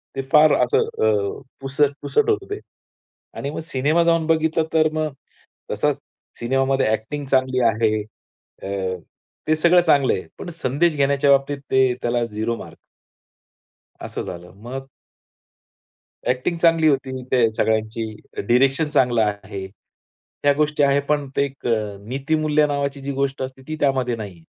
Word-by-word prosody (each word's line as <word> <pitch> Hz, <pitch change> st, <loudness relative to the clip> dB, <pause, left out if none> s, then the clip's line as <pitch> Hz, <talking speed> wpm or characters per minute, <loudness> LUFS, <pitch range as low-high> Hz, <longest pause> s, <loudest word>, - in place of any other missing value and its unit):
ते 135 Hz, -, -1 dB
फार 150 Hz, 0 st, +7 dB
असं 125 Hz, -, +2 dB, 0.2 s
अ, 105 Hz, 0 st, 0 dB, 0.2 s
पुसट-पुसट 145 Hz, -, +1 dB
होतं 405 Hz, -2 st, +1 dB
ते 410 Hz, -, -3 dB, 0.8 s
आणि 140 Hz, -, -3 dB
मग -, -, -5 dB
सिनेमा 155 Hz, +3 st, +1 dB
जाऊन 165 Hz, -1 st, +2 dB
बघितलं 160 Hz, 0 st, +2 dB
तर 155 Hz, -1 st, +4 dB
मग 155 Hz, -2 st, -2 dB, 0.6 s
तसा 145 Hz, +8 st, +1 dB, 0.5 s
सिनेमामध्ये 135 Hz, +2 st, +1 dB
अ‍ॅक्टिंग 110 Hz, +7 st, -2 dB
चांगली 130 Hz, -1 st, +2 dB
आहे. 110 Hz, -1 st, +1 dB, 0.6 s
अ, -, -, -5 dB, 0.8 s
ते 155 Hz, -, +4 dB
सगळं 170 Hz, +3 st, +5 dB
चांगलं 145 Hz, -6 st, +3 dB
आहे. 95 Hz, -, -3 dB, 0.2 s
पण -, -, -6 dB
संदेश 150 Hz, +5 st, +2 dB
घेण्याच्या 140 Hz, 0 st, +3 dB
बाबतीत 140 Hz, +1 st, +2 dB
ते 130 Hz, -1 st, +4 dB
त्याला 120 Hz, 0 st, 0 dB
झिरो 110 Hz, +1 st, -2 dB
मार्क. -, -, -11 dB, 1.3 s
असं -, -, -5 dB
झालं. 90 Hz, 0 st, -8 dB
मग 135 Hz, +3 st, -6 dB, 1.4 s
अ‍ॅक्टिंग 130 Hz, +7 st, 0 dB
चांगली 165 Hz, -2 st, +4 dB
होती 130 Hz, -2 st, 0 dB
ते 120 Hz, -3 st, +4 dB
सगळ्यांची, 110 Hz, 0 st, 0 dB, 0.2 s
डायरेक्शन 135 Hz, +7 st, +2 dB
चांगलं 125 Hz, -5 st, +3 dB
आहे 100 Hz, -2 st, -4 dB, 0.8 s
ह्या 145 Hz, 0 st, +5 dB
गोष्टी 150 Hz, 0 st, +1 dB
आहे, 140 Hz, 0 st, +4 dB
पण 145 Hz, 0 st, -1 dB
ते -, -, +3 dB
एक 135 Hz, -2 st, -7 dB
अ, 105 Hz, -3 st, -1 dB
नीतीमूल्य 150 Hz, +3 st, +1 dB
नावाची 140 Hz, -1 st, -2 dB
जी 140 Hz, -, -4 dB
गोष्ट 135 Hz, 0 st, -2 dB
असते 130 Hz, 0 st, -7 dB
ती 155 Hz, -, -3 dB
त्यामध्ये 130 Hz, -4 st, +1 dB
नाहीये. 100 Hz, -7 st, -9 dB
135 Hz, 140 wpm, -22 LUFS, 120-150 Hz, 1.4 s, फार